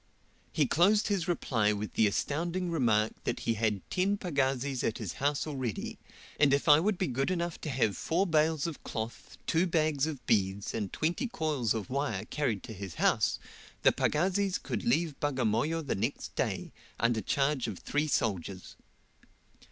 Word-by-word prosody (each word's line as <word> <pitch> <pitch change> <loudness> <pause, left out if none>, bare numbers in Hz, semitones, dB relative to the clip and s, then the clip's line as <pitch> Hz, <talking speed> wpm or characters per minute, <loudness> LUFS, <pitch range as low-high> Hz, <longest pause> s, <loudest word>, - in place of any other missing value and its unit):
He 150 - +2
closed 195 - +3
his 195 -5 0
reply 115 -11 +1
with 105 +1 -4
the 110 - +4
astounding 170 - -1
remark 110 -8 +2
that - - -2
he 115 - +1
had 105 -3 -1
ten 195 +2 +1
pagazis 135 -7 -1
at 110 - 0
his 105 -7 -4
house 145 +1 +1
already, 130 -8 -4 0.4
and 140 -1 +5
if 140 - -3
I 150 0 +8
would 195 +3 +1
be 185 - 0
good 135 +1 -1
enough 170 -2 -2
to 155 - -4
have 120 -6 +1
four 175 +4 +1
bales 160 -3 +2
of 165 -3 -5
cloth, 110 +1 -6
two 170 +3 +2
bags 155 -4 +1
of 140 -7 -6
beads, 100 -1 +1
and 105 -4 -3
twenty 175 - -1
coils 150 - 0
of 110 +1 -4
wire 130 -8 -1
carried 125 -7 -1
to 110 - -7
his 95 -4 -7
house, - - +2 0.5
the - - +7
pagazis 190 +4 +1
could - - -4
leave 150 +4 +1
Bagamoyo 145 +4 0
the - - 0
next 95 - -3
day, - - -2 0.3
under 115 -1 +2
charge 135 +4 +1
of 105 -5 -4
three 150 +9 -1
soldiers. 95 - -2
140 Hz, 170 wpm, -30 LUFS, 110-165 Hz, 0.5 s, I